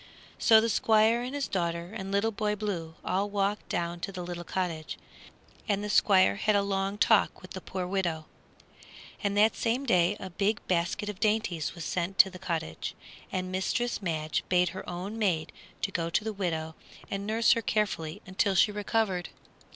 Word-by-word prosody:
So 220 -1 +7
the 225 - +1
Squire 220 +2 +3
and 255 +3 -4
his 285 -1 -1
daughter 170 0 -2
and 195 -3 -5
Little 200 +3 +2
Boy 210 -1 -1
Blue 180 -6 -4
all 200 +2 0
walked 200 0 -1
down 170 0 -2
to 195 - -4
the 180 -2 -6
little 175 0 -5
cottage, 170 -3 -3 0.7
and 205 0 +1
the 210 - -2
Squire 185 - +5
had 210 - +2
a 200 - +3
long 195 0 -1
talk - - +3
with - - -12
the - - -6
poor 185 -1 -4
widow. 175 -4 -1 1.0
And 200 0 0
that 215 +2 +5
same 245 +4 0
day 185 -3 +3
a 190 - -7
big 205 +4 0
basket 175 +3 0
of 205 -2 -5
dainties 210 -7 0
was 170 -3 -6
sent 180 +2 -2
to 190 - +7
the 185 - -10
cottage, 160 - -3 0.4
and 185 0 -2
Mistress 225 +6 -1
Madge 155 -4 -1
bade 180 -1 +3
her - - -7
own 185 +5 -5
maid 170 -7 0 0.4
go 165 -1 -1
to 170 - +1
the 220 0 -3
widow 160 -5 -2 0.4
and 200 +1 -3
nurse 225 +1 +3
her 230 - +3
carefully 200 -8 -1
until 190 +1 0
she 210 +4 +5
recovered. 205 -3 -1
195 Hz, 180 wpm, -29 LUFS, 175-210 Hz, 1.0 s, So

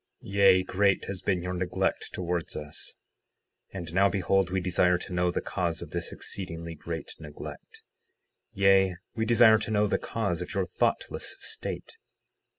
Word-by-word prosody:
Yea, 100 -2 +5
great 95 +1 +2
has 95 -2 -5
been 90 -3 0
your 90 0 -3
neglect 90 0 -1
towards 85 -2 -3
us. 75 -1 -6 0.8
60:6 - - -7
And 85 -2 -6
now 100 +2 +4
behold, 95 0 +1
we 95 +1 0
desire 90 0 +3
to 90 - -7
know 90 0 +2
the 90 - -1
cause 85 -3 -2
of 75 - -11
this 85 0 -1
exceedingly 85 -3 -5
great 80 +1 -6
neglect; 75 -2 -10 0.7
yea, 95 -1 +4 0.2
we 110 0 -1
desire 110 -1 +7
to 110 - -4
know 105 -1 +3
the 105 - 0
cause 100 -7 -2
of 90 +4 -6
your 95 -1 +1
thoughtless 90 - -1
state. - - -4
90 Hz, 160 wpm, -28 LUFS, 85-100 Hz, 0.8 s, desire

